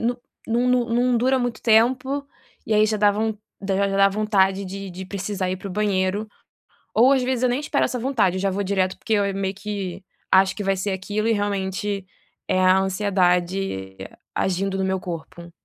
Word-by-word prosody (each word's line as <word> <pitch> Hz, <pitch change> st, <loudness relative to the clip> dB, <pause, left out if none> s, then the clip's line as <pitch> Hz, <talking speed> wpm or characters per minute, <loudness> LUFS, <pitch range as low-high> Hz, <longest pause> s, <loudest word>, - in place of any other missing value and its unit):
no 245 Hz, +2 st, -1 dB, 0.3 s
no 245 Hz, +1 st, +2 dB
dura 260 Hz, +3 st, +2 dB
muito 245 Hz, -2 st, -3 dB
tempo, 255 Hz, +5 st, +2 dB, 0.4 s
e 215 Hz, -, +1 dB
aí 210 Hz, -, +5 dB
já 215 Hz, -, 0 dB
dá 205 Hz, -1 st, +4 dB
von 220 Hz, +1 st, -1 dB, 0.3 s
da 195 Hz, -1 st, -1 dB
da 200 Hz, 0 st, +2 dB
já 195 Hz, -, -1 dB
dá 195 Hz, 0 st, +6 dB
vontade 195 Hz, -1 st, +1 dB
de 195 Hz, +1 st, -6 dB
de 185 Hz, +1 st, -8 dB
precisar 195 Hz, -1 st, -3 dB
ir 185 Hz, -, -1 dB
para 195 Hz, +1 st, -8 dB
o -, -, -7 dB
banheiro, 200 Hz, 0 st, 0 dB, 0.7 s
ou 250 Hz, +5 st, +5 dB
às 265 Hz, -2 st, +3 dB
vezes 255 Hz, -1 st, -1 dB
eu 250 Hz, -, +4 dB
nem 245 Hz, -, 0 dB
espero 295 Hz, -, 0 dB
essa 255 Hz, -, -3 dB
vontade, 225 Hz, -8 st, +1 dB
já 195 Hz, 0 st, 0 dB
vou 200 Hz, +2 st, -2 dB
direto 190 Hz, -1 st, 0 dB
porque 220 Hz, -, -2 dB
eu 200 Hz, -2 st, +1 dB
meio 195 Hz, 0 st, -2 dB
que 195 Hz, -3 st, -5 dB, 0.3 s
acho 190 Hz, 0 st, +5 dB
que 205 Hz, -, -4 dB
vai 195 Hz, 0 st, +1 dB
ser 195 Hz, +2 st, -2 dB
aquilo 205 Hz, +3 st, -2 dB
e 230 Hz, -, +3 dB
realmente 200 Hz, -1 st, -2 dB, 0.4 s
é 185 Hz, -, +1 dB
a 185 Hz, 0 st, +5 dB
ansiedade 185 Hz, -, 0 dB, 0.4 s
agindo 195 Hz, +1 st, 0 dB
no 190 Hz, -, 0 dB
meu 190 Hz, 0 st, 0 dB
corpo. 170 Hz, 0 st, -8 dB
200 Hz, 195 wpm, -23 LUFS, 190-220 Hz, 0.7 s, dá